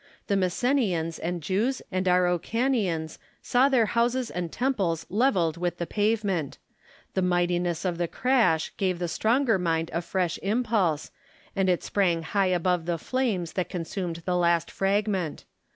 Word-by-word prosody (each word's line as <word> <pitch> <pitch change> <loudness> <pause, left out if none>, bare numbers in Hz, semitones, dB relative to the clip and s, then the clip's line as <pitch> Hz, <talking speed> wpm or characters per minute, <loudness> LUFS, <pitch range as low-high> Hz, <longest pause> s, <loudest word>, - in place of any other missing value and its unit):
The 200 - 0
Messenians 185 - 0
and 170 -1 -3
Jews 220 - 0
and 185 0 -1
Araucanians 180 - +1 0.2
saw 255 +3 +3
their 250 -5 +4
houses 235 +3 0
and 175 -2 -4
temples 195 - -1
levelled 190 - +2
with 175 0 -2
the 170 - -2
pavement; 205 -5 0 0.6
the 190 - 0
mightiness 175 -1 0
of 175 -2 -1
the 175 - 0
crash 230 -9 +2
gave 185 -2 0
the 175 0 -2
stronger 225 - +2
mind 165 -2 0
a 170 - 0
fresh 175 0 -1
impulse, 205 -7 0 0.4
and 195 -1 +2
it 180 - +1
sprang 175 -5 +1
high 195 +3 +1
above 180 -1 0
the 170 -1 0
flames 200 -6 -1
that 180 -2 -2
consumed 170 -1 -4
the 180 - 0
last 170 -1 +2
fragment. 195 -4 -1
180 Hz, 150 wpm, -26 LUFS, 170-215 Hz, 0.6 s, their